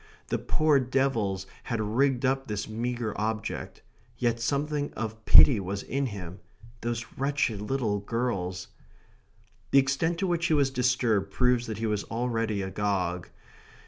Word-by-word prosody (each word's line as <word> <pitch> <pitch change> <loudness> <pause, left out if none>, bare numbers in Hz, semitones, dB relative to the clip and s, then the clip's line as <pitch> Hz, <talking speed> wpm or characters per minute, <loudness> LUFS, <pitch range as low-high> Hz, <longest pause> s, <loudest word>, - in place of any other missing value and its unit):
The - - 0
poor 155 -3 +3
devils 120 -7 0 0.2
had 115 - -2
rigged 125 +5 +1
up 135 +1 0
this 105 -1 -3
meagre 120 0 -3
object. 110 0 -3 0.3
Yet 120 -1 0
something 145 +4 -1
of 110 0 -5
pity 80 +3 +8
was 100 +1 -4
in 140 0 -1
him. 95 -4 -7 0.4
Those 115 0 -2
wretched 135 -7 0
little 110 -3 -1
girls 100 -5 -3 1.0
The - - +4
extent 140 +5 +2
to 190 - -1
which 170 -2 +1
he 160 - +3
was 140 -2 +2
disturbed 120 -6 +1
proves 125 +2 +2
that 110 - -4
he 115 - -2
was 105 -2 0
already 115 -3 -1
agog. 95 -3 -2
115 Hz, 145 wpm, -28 LUFS, 105-135 Hz, 1.0 s, pity